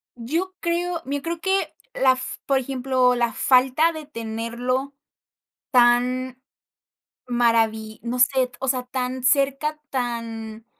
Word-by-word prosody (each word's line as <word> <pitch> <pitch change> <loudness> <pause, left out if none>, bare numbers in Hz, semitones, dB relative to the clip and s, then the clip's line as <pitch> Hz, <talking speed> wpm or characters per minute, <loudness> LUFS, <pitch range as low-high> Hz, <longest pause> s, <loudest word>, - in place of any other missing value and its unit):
Yo 330 +11 -3
creo 340 0 -1
mira 285 +1 -2
yo - - -18
creo 335 0 -3
que 385 +1 0 0.2
la 260 -1 +4
f 255 0 -6
por 275 -1 +2
ejemplo, 255 -1 +1
la 235 -1 0
falta 265 +5 +4
de 315 -2 -8
tenerlo 235 +2 -3 0.8
tan 250 +1 +3 0.9
maravi 225 -3 +1
no 245 +1 -3
sé, 255 0 +4
t - - -29
o 270 - -3
sea, 255 -1 +1
tan 250 0 -3
cerca, 280 +3 +2
tan, 230 -3 -4
255 Hz, 135 wpm, -23 LUFS, 240-275 Hz, 0.9 s, la